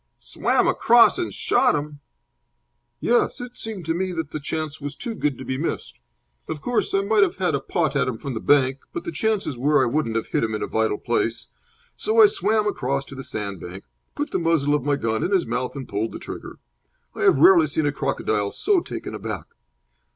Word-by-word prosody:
"Swam - - 0
across 240 +9 +5
and 355 - -2
shot 250 - +2
him!" 145 0 -4 1.0
"Yes. 240 - +1
It 245 0 -8
seemed 215 -6 -6
to 165 - 0
me 185 +2 -2
that 165 -3 -4
the 155 - -4
chance 155 0 -4
was 145 0 -5
too 235 - -5
good 150 - -1
to 130 - -8
be 130 0 -3
missed. 170 - -4 0.5
Of 155 - -4
course, 240 +3 -1
I 195 - +3
might 210 +1 +3
have 195 - +3
had 180 -2 0
a 140 - +1
pot 155 +1 -1
at 140 - +2
him 125 -3 -2
from 135 +3 -5
the 110 - -3
bank, 135 0 +3
but 345 - -4
the 340 - -4
chances 215 - -1
were 145 +1 +3
I - - +3
wouldn't 120 -2 -1
have 115 - 0
hit - - -1
him 110 -1 -1
in - - -3
a - - -2
vital 110 -1 0
place. 115 -1 -1 0.5
So 440 +2 +1
I 435 - +10
swam 220 - +2
across 140 -8 -1
to 135 - -11
the 135 - -7
sandbank, 95 -5 -6 0.3
put 290 0 -3
the - - 0
muzzle 165 -4 +2
of 150 - +2
my 145 0 +1
gun 110 -5 -1
in - - 0
his 195 -3 +2
mouth, 125 +2 -3
and 135 -3 -6
pulled 105 +3 -2
the - - -5
trigger. - - -8 0.6
I - - -7
have 395 -1 +5
rarely 345 -2 +7
seen 155 - -1
a 145 - +2
crocodile 105 -6 -1
so 405 -3 +2
taken 335 - -7
aback." 105 -6 -5
150 Hz, 220 wpm, -23 LUFS, 125-210 Hz, 1.0 s, I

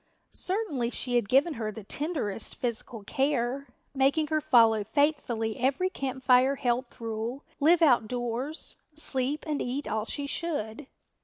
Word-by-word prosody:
Certainly 365 - -1
she 250 0 -2
had 235 -5 +1
given 280 +6 +4
her 220 -4 -3
the 220 0 -9
tenderest 270 - -3
physical 230 -2 -4
care, 270 +2 -1 0.3
making 280 +3 +2
her 310 0 +1
follow 230 -7 +4
faithfully 230 -3 0
every 275 +9 +1
Camp 260 -4 -4
Fire 255 +2 +5
health 245 -1 -2
rule, 230 +4 -4 0.2
live 330 +4 +5
outdoors, 245 +2 0 0.2
sleep 285 -1 +3
and 300 -2 -2
eat 265 +4 -3
all 220 0 -1
she 285 +4 -3
should. 280 -5 -3
260 Hz, 140 wpm, -28 LUFS, 235-290 Hz, 0.3 s, Fire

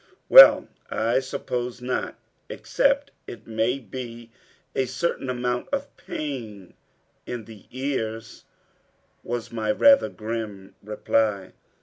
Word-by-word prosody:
"Well, - - +9 0.2
I 115 +3 +1
suppose 125 -2 -4
not, 125 +1 -3 0.3
except 280 +1 0 0.2
it - - -10
may 115 +3 0
be 120 -3 -9 0.4
a 130 - 0
certain 130 +1 -2
amount 125 0 -2
of 280 0 -3
pain 115 - -7 0.5
in 120 -3 -5
the 110 -3 -14
ears," 115 -4 -4 0.8
was 120 -1 -5
my 110 -2 -1
rather 275 - +5
grim 105 -3 -6
reply. 105 -1 -1
120 Hz, 105 wpm, -24 LUFS, 110-130 Hz, 0.8 s, Well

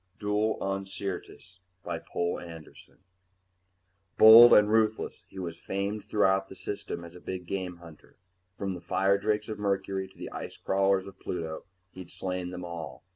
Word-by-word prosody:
_] - - -39
duel 105 +1 0
on 95 0 -2
SYRTIS 95 -1 -7 0.2
by 85 -1 -4
POUL 85 +1 -3
ANDERSON 80 -2 -12 1.2
Bold 115 +2 +10
and 105 0 +7
ruthless, 110 0 0
he - - -15
was 85 -3 -5
famed 100 +2 -3
throughout 95 -2 +2
the - - -10
System 100 -4 -6
as 85 - -12
a 90 - -12
big 90 0 -6
game 90 -1 -4
hunter. 85 -3 -16 0.4
From 100 -1 -3
the 90 - -8
firedrakes 100 +2 +1
of 110 -1 -6
Mercury 95 -1 -1
to 95 - -22
the - - -7
ice - - -7
crawlers 95 0 +1
of 95 -1 -12
Pluto, 80 -3 -5 0.3
he'd 90 -2 -10
slain 90 -1 -4
them 90 0 -7
all. 80 -6 -7
95 Hz, 165 wpm, -28 LUFS, 90-100 Hz, 1.2 s, Bold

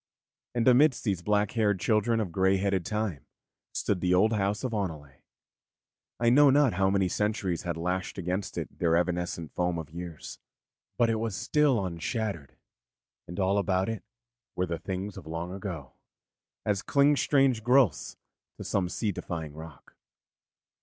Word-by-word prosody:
And 120 0 +1
amidst 130 +2 +5
these 95 -5 -1
black 105 +2 +1
haired 105 -4 +1
children 110 +3 +2
of 100 -6 -2
grey 95 +2 +3
headed 95 -2 0
Time 105 - -3 0.4
stood 95 -4 -1
the 90 0 +3
old 110 +5 +4
house 100 0 0
of 125 -3 -2
Oneleigh. 80 -10 -4 1.0
I 120 0 +3
know 145 +3 +7
not 140 -3 +4
how 95 +2 +2
many 95 -1 +2
centuries 100 -2 -1
had 85 -2 -3
lashed 90 +3 -2
against 95 +2 -3
it - - -6
their 85 -1 +3
evanescent 85 -2 -2
foam 90 -1 0
of 80 -1 -7
years; 85 -1 -8 0.6
but 115 -1 +3
it 110 - 0
was 110 -3 -2
still 140 -8 +2
unshattered, 90 - -4 0.7
and 85 +4 -7
all 95 +1 +2
about 95 0 0
it 115 -2 -4 0.5
were 90 - 0
the 85 -2 -4
things 95 +1 -5
of - - -10
long 85 +3 -4
ago, 95 -8 -6 0.7
as 100 -2 +1
cling 145 +1 +3
strange 135 -4 +2
growths 125 - +2 0.4
to - - -7
some 90 -3 -1
sea 105 +3 -1
defying 80 -4 -5
rock. 80 -3 -12
95 Hz, 160 wpm, -28 LUFS, 85-110 Hz, 1.0 s, know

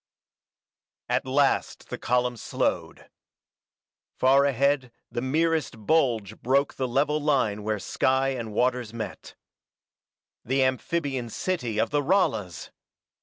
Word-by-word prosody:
At - - 0
last 135 +1 +1
the - - -5
column 125 0 +1
slowed. 115 - -2 1.1
Far 135 +2 +5
ahead 140 -1 +1 0.2
the 120 - -3
merest 150 -4 0
bulge 115 -9 +1
broke 140 +3 +2
the 130 - -2
level 145 +4 +1
line 130 -8 +1
where 105 0 -1
sky 130 +6 +1
and 120 -5 -4
waters 125 0 0
met. 110 -4 -7 1.1
The 130 +2 +1
amphibian 130 -1 -1
city 125 - -2
of - - +1
the 145 0 +2
Ralas! 115 - 0
130 Hz, 115 wpm, -26 LUFS, 115-140 Hz, 1.1 s, Far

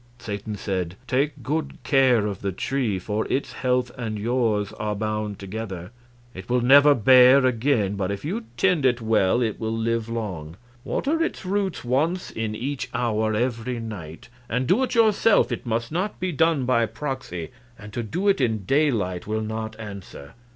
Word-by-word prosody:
Satan 105 -2 -5
said: 95 -3 -3
"Take 140 +1 -1
good 155 +4 -2
care 130 -6 +4
of 100 -3 -4
the 100 - -1
tree, 115 +1 -1
for 105 +4 -2
its 135 - -1
health 125 -1 0
and 110 -3 -3
yours 110 -2 0
are 105 -1 -1
bound 105 -1 -3
together. 95 -2 -6 0.4
It 95 +3 -10
will 125 0 +2
never 140 +4 +7
bear 130 +3 +7
again, 120 -4 +1
but 95 -1 -1
if 100 +6 -4
you 220 +9 -3
tend 180 -6 +2
it 125 -2 +3
well 110 0 +2
it 110 -3 -2
will 110 0 -2
live 115 0 -1
long. 90 -9 -5 0.3
Water 320 +4 -1
its 330 - -2
roots 195 -1 -1
once 155 +9 0
in 110 -1 -3
each 135 +5 -4
hour 110 -2 0
every 120 +1 -1
night 95 -8 -8 0.2
and 125 +3 0
do 190 - +3
it 255 -1 -1
yourself; 225 -1 +4
it - - -4
must 115 +2 -1
not 185 +6 -2
be 185 0 -1
done 160 -3 +2
by 115 -2 +2
proxy, 130 - -5 0.3
and 105 -1 -11
to 120 - -2
do 175 - -2
it 195 -8 +3
in 110 -5 0
daylight 110 - +1
will 110 +1 -1
not 110 0 -5
answer. 100 -9 -9
115 Hz, 175 wpm, -24 LUFS, 105-135 Hz, 0.4 s, never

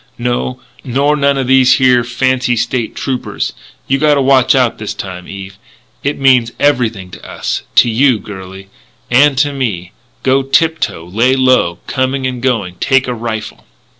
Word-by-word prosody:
No, 125 +1 -2 0.2
nor 140 +4 +1
none 140 -1 +1
o' 135 - 0
these 130 0 +4
here 125 -2 +3
fancy 125 0 0
State 120 0 -2
Troopers. 130 -2 -3 0.3
You 135 +1 +1
gotta 150 -1 +3
watch 135 -1 +3
out 125 -3 +1
this 105 -1 -5
time, 90 -4 -7
Eve. 100 0 -9 0.4
It 145 +1 -1
means 125 -4 +3
everything 115 -10 0
to - - -12
us - - -4
to - - +6
you, 120 +2 +3
girlie 95 -1 -10 0.4
and 135 +2 +4
to 145 +2 +1
me. 100 -10 -3 0.3
Go 135 +1 +2
tip 160 +4 +1
toe. 85 -6 -3
Lay 115 +9 +1
low, 130 -10 +2
coming 130 +1 -1
and 125 -2 -3
going. 110 -9 -1
Take 135 -1 +2
a 125 - -2
rifle." 110 -1 -6
125 Hz, 165 wpm, -14 LUFS, 110-135 Hz, 0.4 s, to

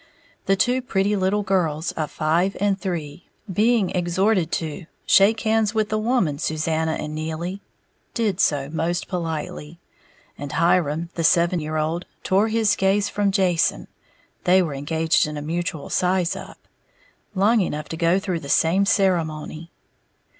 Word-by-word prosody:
The 195 - +4
two 250 +6 +1
pretty 205 -4 0
little 200 +2 0
girls 170 -4 0
of 155 -4 -3
five 170 +5 0
and 200 -1 0
three, 165 -4 -5 0.3
being 215 0 +2
exhorted 180 0 +1
to 160 +1 -4 0.2
"shake 215 +3 +4
hands 220 -1 +1
with 215 -1 +1
the 215 - 0
woman, 215 - 0
Susanna 160 0 -1
and 150 -1 -5
Neely," 160 +5 -4 0.5
did 210 -6 0
so 140 -6 +1
most 165 +4 -2
politely; 160 -2 -5 0.6
and 145 0 -6
Hiram, 170 -1 +1
the 165 - -3
seven 170 +2 +3
year 155 0 -3
old, 160 +3 -2 0.2
tore 195 +3 +2
his 220 -2 +2
gaze 195 +1 +1
from 205 -1 0
Jason 180 -4 +1 0.6
(they 185 +1 +5
were 155 -4 -3
engaged 160 +3 +1
in 150 0 -5
a - - -4
mutual 170 0 -4
size 180 -1 +1
up) - - -9 0.8
long 210 +4 +3
enough 150 -4 -3
to - - -4
go 170 +2 +2
through 185 -3 -2
the 140 - -9
same 180 +7 +3
ceremony. 165 -5 0
175 Hz, 150 wpm, -22 LUFS, 160-195 Hz, 0.8 s, they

